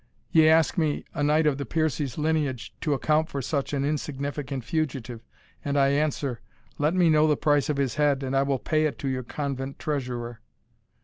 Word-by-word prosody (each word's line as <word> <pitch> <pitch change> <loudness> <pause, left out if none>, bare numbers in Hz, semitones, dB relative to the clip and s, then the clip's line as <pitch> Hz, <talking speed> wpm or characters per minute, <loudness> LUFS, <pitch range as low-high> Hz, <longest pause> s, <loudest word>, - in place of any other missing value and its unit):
Ye 160 -1 +6
ask 160 +2 +3
me, 155 -3 0
a - - -3
knight 150 +2 +3
of 145 -2 +2
the - - -1
Piercie's 150 -3 -1
lineage, 150 -5 -1
to 150 -3 +1
account 155 +3 +1
for 140 - -4
such 140 +1 -2
an 140 -1 0
insignificant 140 -2 -3
fugitive, 125 -6 -3 0.4
and 145 0 -1
I 135 -1 +4
answer, 140 -3 -1 0.4
let 150 +4 +2
me 180 -2 +4
know 155 -1 +5
the 150 -2 +2
price 145 -2 +2
of 150 - 0
his 135 -3 0
head, 140 -2 +2
and 135 0 -2
I 135 - +4
will 140 -1 +1
pay 155 +4 0
it 145 - -5
to 140 - -4
your 130 -1 -1
convent 135 +1 -4
treasurer." 125 -6 -4
145 Hz, 195 wpm, -26 LUFS, 135-155 Hz, 0.4 s, Ye